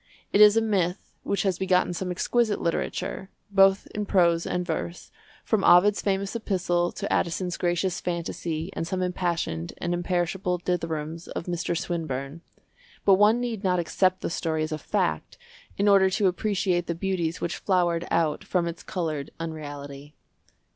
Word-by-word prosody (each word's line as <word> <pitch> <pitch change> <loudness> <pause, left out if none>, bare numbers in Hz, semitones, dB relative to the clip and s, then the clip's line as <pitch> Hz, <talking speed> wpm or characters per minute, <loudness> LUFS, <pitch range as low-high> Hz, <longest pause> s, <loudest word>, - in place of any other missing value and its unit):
It 205 - +5
is 210 +1 +8
a - - +5
myth 190 -4 -1
which 200 - -1
has 190 -3 0
begotten 185 -1 +2
some 180 +2 -3
exquisite 215 +4 +1
literature, 170 +3 -2 0.2
both 195 0 +5
in 210 -1 -3
prose 170 -4 +3
and 180 0 -1
verse, 170 +1 -4 0.3
from 215 -4 +1
Ovid's 185 +4 +6
famous 195 +1 -1
epistle 180 -5 0
to 200 - -3
Addison's 175 +1 0
gracious 175 +1 -1
fantasy 170 -1 -3
and 165 - -3
some 185 +1 -1
impassioned 170 - -2
and 175 0 -2
imperishable 180 +1 -1
dithyrambs 165 -2 -3
of - - -5
Mr. 175 -1 -2
Swinburne; 160 -5 -4 0.6
but 195 - +7
one 215 +3 +5
need 235 -4 -3
not 180 -1 +2
accept 185 +2 +1
the - - -3
story 160 -2 -1
as 155 - -4
a 155 - -3
fact 80 - -2 0.4
in 200 - +2
order 195 -1 +6
to 195 +2 0
appreciate 185 -2 0
the 170 - -2
beauties 180 -2 -2
which 170 - -3
flowered 175 -3 +1
out 160 -3 +1
from 175 -2 0
its 170 0 -6
coloured 160 -7 -3
unreality. 145 -2 -7
175 Hz, 160 wpm, -26 LUFS, 165-195 Hz, 0.6 s, is